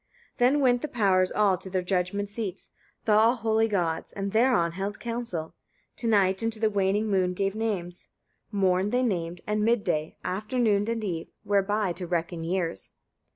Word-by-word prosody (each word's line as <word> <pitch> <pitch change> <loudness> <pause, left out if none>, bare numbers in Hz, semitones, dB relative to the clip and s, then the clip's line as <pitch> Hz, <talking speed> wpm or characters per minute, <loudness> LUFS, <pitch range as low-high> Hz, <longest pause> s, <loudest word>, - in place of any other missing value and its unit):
6. - - -29
Then 260 +4 +4
went 245 -2 +3
the - - -2
powers 190 -7 +2
all 200 -3 +2
to 190 - -8
their 185 -1 -1
judgment 185 +2 -1
seats, 205 -2 -5 0.3
the 220 - +2
all 220 +3 +5
holy 225 -1 +1
gods, 170 -6 -1
and 195 0 -4
thereon 220 -7 +3
held 195 +4 -4
council: 230 -9 -4 0.4
to 235 - -3
night 195 -3 +3
and 225 0 0
to 215 - -9
the 220 -1 +2
waning 200 +1 +1
moon 185 -3 +1
gave 195 +1 0
names; 195 -6 -3 0.4
morn 190 -1 +2
they 250 +3 +1
named, 175 -6 -2
and 210 0 0
mid 230 -1 +2
day, 155 +1 -2
afternoon 215 +1 0
and 230 -1 -2
eve, 170 -5 -3 0.2
whereby 205 -1 +1
to 180 0 -5
reckon 170 -1 -2
years. 170 - -2
200 Hz, 180 wpm, -27 LUFS, 180-220 Hz, 0.4 s, all